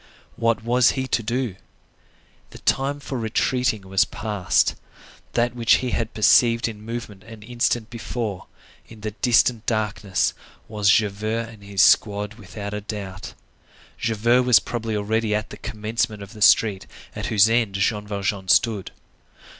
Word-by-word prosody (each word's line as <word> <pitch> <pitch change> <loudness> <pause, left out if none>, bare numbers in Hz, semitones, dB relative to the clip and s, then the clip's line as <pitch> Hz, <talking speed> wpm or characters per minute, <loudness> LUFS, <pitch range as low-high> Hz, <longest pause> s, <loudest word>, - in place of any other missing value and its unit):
What 115 -1 0
was 120 +1 +3
he 130 - -1
to 120 - 0
do? 120 -3 -2 0.9
The - - -12
time 140 +2 0
for 135 -2 -5
retreating 115 0 0
was 95 0 +3
passed. 105 -4 0 0.6
That 120 +1 0
which 115 -2 +3
he 125 -1 -2
had 115 -1 -2
perceived 115 +2 +4
in 110 -2 -8
movement 110 -3 -7
an 110 -2 -12
instant 120 0 -1
before, 115 -4 -5 0.4
in 110 -2 -14
the 110 0 -4
distant 120 +1 +2
darkness, 105 -4 0 0.3
was 105 -2 0
Javert 110 +3 +1
and 110 -3 -14
his 100 0 +2
squad 105 0 +3
without 105 -1 -8
a 105 - -4
doubt. 100 -3 -7 0.6
Javert 115 +2 +2
was 125 -1 +5
probably 115 -2 -4
already 110 +1 0
at 105 0 -3
the - - -8
commencement 110 0 -3
of 100 +3 -12
the 105 - -12
street 100 -1 +4 0.3
at - - -4
whose 105 -1 +5
end 115 -3 +1
Jean 105 +1 0
Valjean 100 -1 -3
stood. 105 0 +2
110 Hz, 150 wpm, -23 LUFS, 105-115 Hz, 0.9 s, was